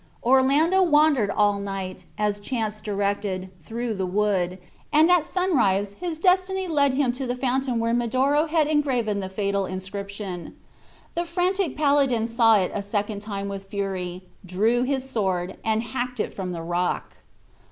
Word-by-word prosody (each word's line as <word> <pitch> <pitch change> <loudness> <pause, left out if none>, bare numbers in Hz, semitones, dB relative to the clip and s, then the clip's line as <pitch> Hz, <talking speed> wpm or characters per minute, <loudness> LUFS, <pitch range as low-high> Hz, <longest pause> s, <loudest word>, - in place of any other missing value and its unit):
Orlando 275 +9 +4
wandered 295 - +4
all 205 0 +2
night, 195 -2 -5
as 210 -1 0
chance 215 -1 -3
directed, 200 -2 -2
through 230 +7 -4
the 190 -2 -2
wood, 185 -2 0 0.3
and 310 +3 +5
at 355 -3 +5
sunrise 225 - +1
his 340 -3 -4
destiny 370 +1 +2
led 285 -5 +2
him 265 -3 +2
to 255 +1 -5
the 245 - -1
fountain 255 -1 0
where 230 0 0
Medoro 260 +6 +2
had 315 -1 +2
engraved 255 -9 0
the 190 - -5
fatal 200 0 -1
inscription. 190 -1 -6 0.6
The 345 +1 -1
frantic 355 -1 0
paladin 280 -6 +3
saw 230 -1 +4
it 185 -2 0
a 205 - -2
second 205 +1 -2
time 200 -2 -4
with 195 0 -6
fury, 185 -3 -3 0.2
drew 210 +7 +1
his 265 0 -1
sword, 190 -7 -1
and 220 0 +1
hacked 250 0 -4
it - - -2
from 185 -2 -4
the 165 -2 -5
rock. 175 +1 -2
225 Hz, 155 wpm, -24 LUFS, 200-280 Hz, 0.6 s, and